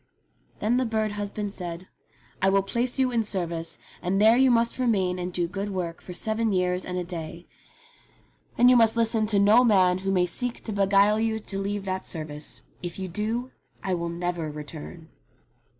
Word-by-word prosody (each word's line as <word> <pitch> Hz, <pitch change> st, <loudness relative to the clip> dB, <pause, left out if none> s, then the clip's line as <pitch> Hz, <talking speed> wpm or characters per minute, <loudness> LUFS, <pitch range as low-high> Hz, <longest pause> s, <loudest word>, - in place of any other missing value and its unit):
Then 225 Hz, +4 st, +1 dB
the 255 Hz, -, +1 dB
bird 220 Hz, -1 st, 0 dB
husband 205 Hz, 0 st, -4 dB
said, 175 Hz, -1 st, -6 dB, 0.5 s
"I 195 Hz, -, +4 dB
will 195 Hz, 0 st, +3 dB
place 240 Hz, +6 st, 0 dB
you 260 Hz, -1 st, +2 dB
in 235 Hz, -2 st, +2 dB
service, 170 Hz, -5 st, -1 dB, 0.2 s
and 185 Hz, +2 st, 0 dB
there 220 Hz, +2 st, +6 dB
you 260 Hz, +1 st, +5 dB
must 235 Hz, +1 st, +2 dB
remain 190 Hz, -7 st, +1 dB
and 180 Hz, 0 st, -3 dB
do 175 Hz, -1 st, -1 dB
good 195 Hz, +3 st, -4 dB
work 175 Hz, -4 st, -4 dB
for -, -, -10 dB
seven 220 Hz, +4 st, -1 dB
years 180 Hz, -1 st, 0 dB
and 180 Hz, 0 st, -4 dB
a 180 Hz, -, -1 dB
day, 170 Hz, -1 st, -7 dB, 1.1 s
and 245 Hz, -, +6 dB
you 250 Hz, -, +7 dB
must 230 Hz, -1 st, +4 dB
listen 225 Hz, -1 st, +2 dB
to 210 Hz, -1 st, +1 dB
no 210 Hz, +5 st, +6 dB
man 185 Hz, -5 st, +4 dB
who 195 Hz, +1 st, -3 dB
may 180 Hz, -2 st, +3 dB
seek 240 Hz, +7 st, -4 dB
to 220 Hz, -, -5 dB
beguile 200 Hz, +1 st, +4 dB
you 220 Hz, 0 st, 0 dB
to 195 Hz, -1 st, -4 dB
leave 200 Hz, 0 st, -3 dB
that 190 Hz, 0 st, -2 dB
service. 155 Hz, -2 st, -4 dB, 0.2 s
If 175 Hz, -1 st, -6 dB
you 190 Hz, -1 st, -4 dB
do 225 Hz, +7 st, -2 dB, 0.3 s
I 190 Hz, -, -1 dB
will 170 Hz, -1 st, -2 dB
never 170 Hz, -2 st, -3 dB
return." 145 Hz, -, -9 dB
195 Hz, 190 wpm, -26 LUFS, 180-220 Hz, 1.1 s, you